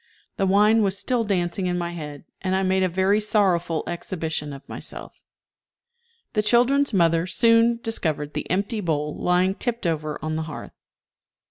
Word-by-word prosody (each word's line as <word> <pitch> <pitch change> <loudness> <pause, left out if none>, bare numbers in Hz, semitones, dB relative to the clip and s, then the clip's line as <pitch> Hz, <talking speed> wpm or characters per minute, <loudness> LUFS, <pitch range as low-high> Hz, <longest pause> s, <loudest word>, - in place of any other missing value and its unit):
The 195 -3 +1
wine 210 +3 +4
was 195 -2 +1
still 240 +3 0
dancing 185 -2 -1
in 180 0 -1
my 175 0 -3
head, 150 -3 -8 0.2
and 190 0 0
I 190 - +1
made 190 0 +2
a 185 - +2
very 190 +4 +2
sorrowful 190 -6 +1
exhibition 160 -3 -4
of 140 0 -10
myself. - - -8 1.1
The 210 - +2
children's 245 +6 +3
mother 170 -3 +2
soon 230 +3 +4
discovered 155 -10 -1
the - - -4
empty 200 +4 -1
bowl 150 -4 -1
lying 180 +2 +2
tipped 235 0 -3
over 155 -2 -1
on 155 0 -2
the - - -1
hearth. 150 - -8
185 Hz, 160 wpm, -24 LUFS, 165-210 Hz, 1.1 s, wine